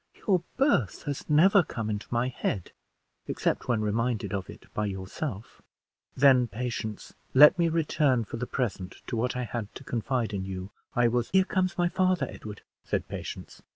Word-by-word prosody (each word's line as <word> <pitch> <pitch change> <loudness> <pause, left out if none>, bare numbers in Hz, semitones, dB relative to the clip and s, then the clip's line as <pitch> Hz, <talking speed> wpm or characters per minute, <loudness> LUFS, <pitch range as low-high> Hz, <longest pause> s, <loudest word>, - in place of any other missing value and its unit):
"Your 185 -4 +4 0.2
birth 265 - +2
has 145 -1 -5
never 190 +7 +6
come 115 -9 -4
into 105 -1 -3
my 120 +1 0
head, 100 -7 -3 0.6
except - - -1
when 120 -3 +1
reminded 115 +1 -1
of 95 -3 -3
it - - -11
by 105 0 -1
yourself." 100 +4 -6 0.6
"Then, 130 -3 +6
Patience, 110 -1 -5 0.2
let 150 +6 +8
me 170 -1 +3
return 150 -6 +2
for - - -6
the 125 +1 -3
present 100 -8 -3
to 120 - -4
what 120 +2 0
I 125 - -1
had 110 -2 -5
to - - -9
confide 120 -1 -1
to 100 - -2
you. 95 +1 -5 0.2
I 120 -1 +4
was 120 0 0
" - - -37
"Here 190 0 +6
comes 185 -2 0
my 175 -1 +3
father, 185 -5 +1
Edward," 105 -3 -9 0.2
said - - -2
Patience. - - -7
120 Hz, 180 wpm, -28 LUFS, 105-150 Hz, 0.6 s, let